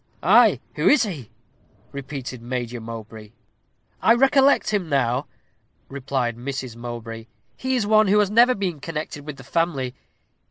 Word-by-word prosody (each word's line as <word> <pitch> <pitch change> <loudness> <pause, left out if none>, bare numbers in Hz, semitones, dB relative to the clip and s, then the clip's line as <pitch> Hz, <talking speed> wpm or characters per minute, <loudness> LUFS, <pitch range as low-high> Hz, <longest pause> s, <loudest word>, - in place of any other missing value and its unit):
"Ay, - - +5 0.2
who - - +1
is 275 -5 +5
he?" 155 - -6 0.6
repeated 135 -3 -7
Major 120 -1 -4
Mowbray. 110 -1 -9 0.7
"I 230 - +5
recollect 270 0 +4
him 190 -6 -1
now," 130 -1 0 0.6
replied 135 -3 -2
Mrs. 130 -1 -5
Mowbray; 115 -1 -7 0.3
"he 260 0 -2
is 235 -5 0
one 215 0 +4
who 205 +2 +4
has 205 -1 +2
ever 240 +3 +5
been 185 -6 -3
connected 150 -1 -6
with 150 -2 -6
the 135 - -12
family. 140 -3 -1
140 Hz, 145 wpm, -23 LUFS, 120-200 Hz, 0.7 s, Ay